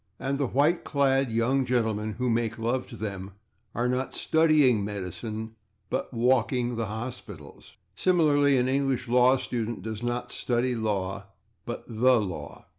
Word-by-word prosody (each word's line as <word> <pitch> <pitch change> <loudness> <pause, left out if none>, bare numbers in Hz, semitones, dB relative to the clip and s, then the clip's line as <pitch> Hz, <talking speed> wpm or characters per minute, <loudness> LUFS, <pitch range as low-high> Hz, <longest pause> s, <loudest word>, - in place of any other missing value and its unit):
And 135 +1 -2
the 140 - +1
white 145 +8 +2
clad 135 -2 +2
young 120 +4 +1
gentlemen 110 -4 0
who 125 +3 -2
make 115 -1 0
love 120 +3 -1
to 115 - -10
them 100 -2 -5 0.4
are 120 +2 +1
not 125 +1 -1
/studying 155 -8 +3
medicine/ 105 +3 -5 0.4
but 130 - -2
/walking 125 0 +1
the 115 -1 -2
hospitals/. 105 - -8 0.2
Similarly, 145 -6 +3
an 125 0 +2
English 135 -2 0
law 125 +2 +5
student 120 -5 -4
does 110 0 -5
not 120 0 -3
study 125 +1 0
law, 100 -4 -2 0.4
but 120 - -6
/the/ 115 -1 +3
law. 90 - -8
120 Hz, 145 wpm, -27 LUFS, 110-130 Hz, 0.4 s, law